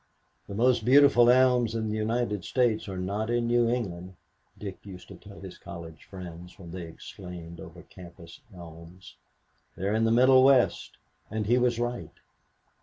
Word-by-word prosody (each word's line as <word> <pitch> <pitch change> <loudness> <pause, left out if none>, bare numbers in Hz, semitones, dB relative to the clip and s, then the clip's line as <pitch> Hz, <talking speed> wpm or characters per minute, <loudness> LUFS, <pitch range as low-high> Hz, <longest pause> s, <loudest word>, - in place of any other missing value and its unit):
"The 100 - -7
most 120 +1 +2
beautiful 130 -1 +6
elms 125 -2 +3
in 110 -1 -2
the - - -2
United 110 -2 -2
States 115 -3 0
are 95 - -6
not 100 +4 -3
in 120 0 0
New 120 0 +2
England," 95 -7 -4 0.4
Dick 100 -3 -8
used 95 -3 -11
to - - -10
tell 100 -1 -14
his 95 -2 -10
college 80 -2 -10
friends, 90 -1 -11
when 85 -4 -11
they 90 -1 -7
exclaimed 85 0 -10
over - - -12
campus 85 -2 -14
elms. 85 0 -13 0.6
"They're 100 +3 -2
in 110 +1 +1
the 115 - +2
Middle 130 +2 +5
West." 135 -2 +2 0.3
And 110 0 -3
he 120 +4 +3
was 120 -1 +1
right. 120 0 -4
105 Hz, 165 wpm, -27 LUFS, 90-120 Hz, 0.6 s, beautiful